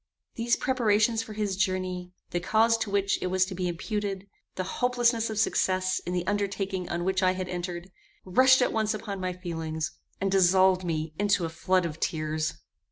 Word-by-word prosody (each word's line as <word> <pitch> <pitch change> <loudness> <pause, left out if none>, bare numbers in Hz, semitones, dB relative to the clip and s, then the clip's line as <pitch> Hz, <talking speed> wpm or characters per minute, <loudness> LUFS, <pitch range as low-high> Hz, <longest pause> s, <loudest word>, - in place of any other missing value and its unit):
These 235 0 +1
preparations 225 -3 +2
for 220 -1 -8
his 210 -2 -1
journey, 185 -2 -1 0.2
the 175 - 0
cause 220 +5 +3
to 220 - -2
which 200 0 +1
it - - -1
was 185 0 +2
to 190 - -7
be 180 0 -2
imputed, 195 +2 -3 0.3
the 185 - -2
hopelessness 235 +2 +1
of 220 - -4
success 185 -3 +1
in - - -1
the 180 -1 -1
undertaking 195 -2 -2
on 170 0 -2
which 190 0 +1
I 185 0 +3
had 185 -1 -4
entered, 175 0 -5 0.3
rushed 255 +7 +5
at - - 0
once 220 -1 +1
upon 200 -2 -5
my 185 0 -1
feelings, 165 -3 -4 0.3
and 195 0 0
dissolved 185 0 +4
me 160 -2 -2
into 200 -3 +2
a - - -3
flood 180 +3 +1
of 160 -1 -5
tears. 155 -1 -1
190 Hz, 185 wpm, -27 LUFS, 180-210 Hz, 0.3 s, rushed